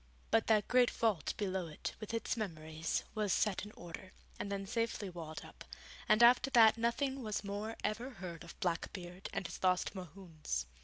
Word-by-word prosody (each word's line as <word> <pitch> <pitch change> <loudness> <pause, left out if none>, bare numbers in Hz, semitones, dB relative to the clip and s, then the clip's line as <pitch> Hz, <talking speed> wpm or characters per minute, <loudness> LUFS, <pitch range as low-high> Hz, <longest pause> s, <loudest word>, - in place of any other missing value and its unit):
But 225 - +4
that 215 -2 +4
great 250 0 +5
vault 210 -10 0
below 190 -3 -1
it, 155 - -5
with 215 - -6
its 230 +2 -1
memories, 160 -7 -2
was 210 -3 0
set 195 -1 +2
in 210 - -8
order, 175 +2 -9 0.3
and 200 - -3
then 195 0 -2
safely 225 -2 -1
walled 160 -3 -7
up, - - -12 0.5
and 215 +2 +6
after 245 +3 +7
that 230 -4 +7
nothing 260 +4 0
was 215 -3 -2
more 205 +3 -3
ever 230 +5 -1
heard 180 -8 -7
of 170 - -12
Blackbeard 175 +1 -3
and - - -3
his - - -6
lost 185 +1 +2
Mohunes. 165 - -5
200 Hz, 175 wpm, -35 LUFS, 175-225 Hz, 0.5 s, after